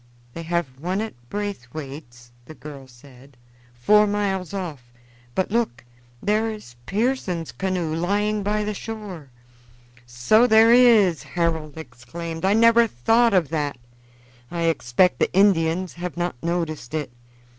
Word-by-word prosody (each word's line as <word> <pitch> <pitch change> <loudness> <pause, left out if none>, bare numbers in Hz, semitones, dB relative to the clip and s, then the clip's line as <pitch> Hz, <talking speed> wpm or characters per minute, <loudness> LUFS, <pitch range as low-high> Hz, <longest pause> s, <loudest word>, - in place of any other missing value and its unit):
"They 165 - -6
have 165 -6 -3
one 180 +5 -2
at 220 0 -4 0.2
Braithwaite's," 140 -10 -7
the 155 - -12
girl 140 -3 -10
said, 130 +1 -18 0.4
"four 210 +13 +4
miles 195 -4 -1
off; 155 -11 -6 0.4
but 190 - -1
look, 230 - -1 0.4
there 215 +2 +1
is 210 - -9
Pearson's 200 - -1
canoe 185 -4 -2
lying 205 +5 0
by 210 +1 -1
the 210 0 -2
shore." 200 -9 -8 0.8
"So 125 - +3
there 225 0 +6
is!" 225 -9 +5
Harold 160 -3 -2
exclaimed. 160 +5 -7
"I 195 +2 +3
never 230 +1 +5
thought 225 - +2
of 170 -7 +2
that. 145 -4 -2 0.7
I 170 0 -4
expect 165 +1 +2
the - - +1
Indians 185 -2 +2
have 175 0 -6
not 175 0 -1
noticed 165 -5 -3
it. 150 -5 -3
175 Hz, 135 wpm, -23 LUFS, 150-210 Hz, 0.8 s, there